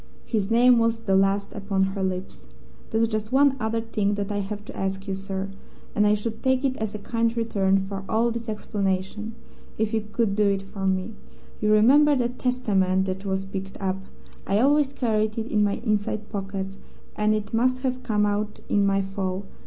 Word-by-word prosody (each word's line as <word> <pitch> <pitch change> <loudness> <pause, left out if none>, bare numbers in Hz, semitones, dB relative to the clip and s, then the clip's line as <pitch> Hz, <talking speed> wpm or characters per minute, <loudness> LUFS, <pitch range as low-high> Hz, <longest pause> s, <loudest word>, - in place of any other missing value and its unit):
His 210 -4 -1
name 240 +1 +6
was 230 0 +1
the 195 -4 +1
last 195 +1 +2
upon 195 -1 0
her 195 - -3
lips. 185 - -4 0.4
"There's 225 +1 +2
just 215 -1 -3
one 275 0 +5
other 225 0 -1
thing 210 -3 0
that 205 0 -3
I 205 - -1
have 205 +1 -5
to - - -9
ask 195 +1 -3
you, 195 - -1
sir, 195 0 -4 0.4
and 210 0 +3
I 210 - +4
should 220 +1 -4
take 260 +1 +2
it 260 -1 +1
as 220 -1 -3
a - - -2
kind 230 +2 -1
return 195 -4 +2
for 195 -1 -5
all 230 +2 +2
this 230 0 -4
explanation, 205 +1 -2 0.4
if 220 +1 0
you 220 - +2
could 220 -3 +1
do 210 0 +3
it 195 -1 +1
for 195 0 -4
me. 190 +3 0 0.5
You 210 0 +2
remember 280 +8 +6
that 245 -1 -1
Testament 195 -7 +1
that 190 +1 -4
was 190 0 -1
picked 195 0 -6
up. 190 -1 -1 0.5
I 195 - +2
always 285 +2 +4
carried 215 -5 0
it 225 +1 -3
in 210 -2 +3
my 205 -1 +2
inside 210 0 -1
pocket, 195 -1 -4 0.4
and 215 0 +2
it 210 0 -4
must 255 +3 +2
have 255 -1 -1
come 215 -4 +1
out 210 +1 -1
in 205 - +3
my 195 0 +2
fall. 195 0 -3
210 Hz, 200 wpm, -25 LUFS, 195-230 Hz, 0.5 s, name